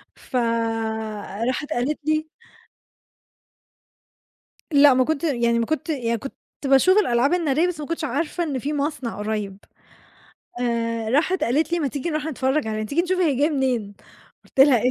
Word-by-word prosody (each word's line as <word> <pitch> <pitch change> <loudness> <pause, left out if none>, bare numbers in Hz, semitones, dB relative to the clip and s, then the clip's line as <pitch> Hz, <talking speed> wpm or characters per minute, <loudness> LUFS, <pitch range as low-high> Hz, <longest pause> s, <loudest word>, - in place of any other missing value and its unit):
ف 260 - -11 1.1
راحت 275 +4 -2
قالت 260 +5 -1
لي 310 0 +1 2.5
لأ 280 -1 +7
ما 255 0 +3
كنت 315 +2 -1
يعني 235 -5 +1
ما 230 - 0
كنت 315 +1 -2
يعني 235 -6 -1
كنت 275 - -7 0.3
باشوف 275 +9 +5
الألعاب 255 - +3
النارية 325 -1 +2
بس 330 -4 -4
ما 295 - -5
كنتش 335 -1 -3
عارفة 335 +2 -1
إن 285 -5 -2
في 285 +4 -3
مصنع 285 -4 -2
قُريب. 210 -2 -3 1.0
آآ 230 -2 -1
راحت 360 +8 +2
قالت 300 +7 +1
لي: 345 - +2
"ما 295 -4 0
تيجي 285 +5 -4
نروح 305 -1 -2
نتفرج 265 -3 0
عليه، 215 0 -2
تيجي 305 +9 +1
نشوف 370 +1 -1
هي 320 -6 +3
جاية 295 +4 +2
منين؟" 250 -8 -1 0.5
قُلت 265 - -2
لها: 270 -3 +7
"إيه؟ 250 - +3
280 Hz, 160 wpm, -23 LUFS, 240-315 Hz, 2.5 s, لأ